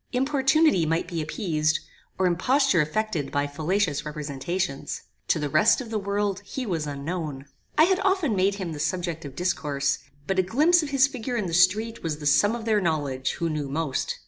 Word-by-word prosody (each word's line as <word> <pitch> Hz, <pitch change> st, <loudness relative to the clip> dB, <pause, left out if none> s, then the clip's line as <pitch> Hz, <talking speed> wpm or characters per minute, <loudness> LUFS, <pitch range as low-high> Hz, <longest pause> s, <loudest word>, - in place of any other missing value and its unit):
Importunity 270 Hz, -, +3 dB
might 165 Hz, +2 st, 0 dB
be 170 Hz, -2 st, -3 dB
appeased, 155 Hz, -2 st, 0 dB, 0.4 s
or 190 Hz, -, +1 dB
imposture 210 Hz, -, +3 dB
effected 155 Hz, -2 st, -2 dB
by 145 Hz, 0 st, 0 dB
fallacious 155 Hz, +2 st, -1 dB
representations. 150 Hz, +2 st, -3 dB, 0.3 s
To -, -, +2 dB
the 150 Hz, -1 st, -1 dB
rest 155 Hz, +10 st, +4 dB
of 240 Hz, -4 st, -7 dB
the 220 Hz, -, 0 dB
world 200 Hz, 0 st, -1 dB
he 255 Hz, +6 st, -5 dB
was 165 Hz, -7 st, -2 dB
unknown. 145 Hz, -1 st, -4 dB, 0.3 s
I 310 Hz, -, +7 dB
had 375 Hz, +3 st, +3 dB
often 380 Hz, -, +1 dB
made 195 Hz, +1 st, +2 dB
him 185 Hz, -4 st, -4 dB
the 150 Hz, -, -7 dB
subject 165 Hz, 0 st, -2 dB
of 140 Hz, -, -8 dB
discourse; 150 Hz, -6 st, -1 dB, 0.3 s
but 190 Hz, +3 st, 0 dB
a -, -, +7 dB
glimpse 305 Hz, -, +3 dB
of 305 Hz, -, -4 dB
his 275 Hz, -1 st, +4 dB
figure 255 Hz, -3 st, -4 dB
in 210 Hz, -, -1 dB
the 170 Hz, -, -4 dB
street 205 Hz, +6 st, +3 dB
was 160 Hz, -3 st, -3 dB
the 150 Hz, -, -9 dB
sum 205 Hz, +10 st, +4 dB
of 230 Hz, -2 st, -6 dB
their 215 Hz, -2 st, +2 dB
knowledge 145 Hz, -6 st, -1 dB
who 170 Hz, -, -2 dB
knew 150 Hz, -3 st, -3 dB
most. 145 Hz, -1 st, -2 dB
180 Hz, 195 wpm, -25 LUFS, 155-225 Hz, 0.4 s, I